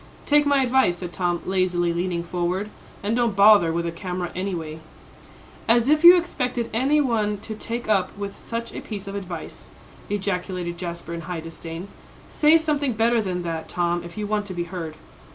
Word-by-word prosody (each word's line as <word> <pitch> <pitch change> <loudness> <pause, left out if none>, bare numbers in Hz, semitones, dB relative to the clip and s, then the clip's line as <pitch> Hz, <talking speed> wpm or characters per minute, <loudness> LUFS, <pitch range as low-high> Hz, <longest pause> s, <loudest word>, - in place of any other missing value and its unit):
"Take 295 0 +4
my 280 -2 +4
advice," 255 -8 +3
said 175 -1 -7
Tom, 175 -2 -1
lazily 180 -2 +1
leaning 175 0 -1
forward, 180 +4 -2 0.3
"and 210 +3 0
don't 235 -4 +1
bother 200 -4 +7
with 170 +1 -1
a 170 - -1
camera 180 0 -4
anyway." 170 -4 -4 0.9
"As 235 +3 +4
if 305 +1 +3
you 350 +1 +11
expected 250 -9 -2
any 270 +6 +3
one 220 -7 +1
to 220 - -6
take 230 +2 -5
up 200 -3 +1
with 200 -1 -5
such 230 0 -5
a - - -5
piece 205 -3 -6
of 195 - -6
advice," 185 -4 -7 0.4
ejaculated 180 -3 -3
Jasper, 170 -1 -5
in 170 - -4
high 175 +1 -5
disdain. 165 +2 -8 0.4
"Say 305 +2 +5
something 295 -5 0
better 230 +1 +2
than 180 -3 -3
that, 165 -1 -4
Tom, 175 -1 0
if 170 +2 -10
you 210 - -2
want 210 0 -1
to 185 - -6
be 175 - -1
heard." 165 -3 -6
195 Hz, 185 wpm, -24 LUFS, 175-230 Hz, 0.9 s, you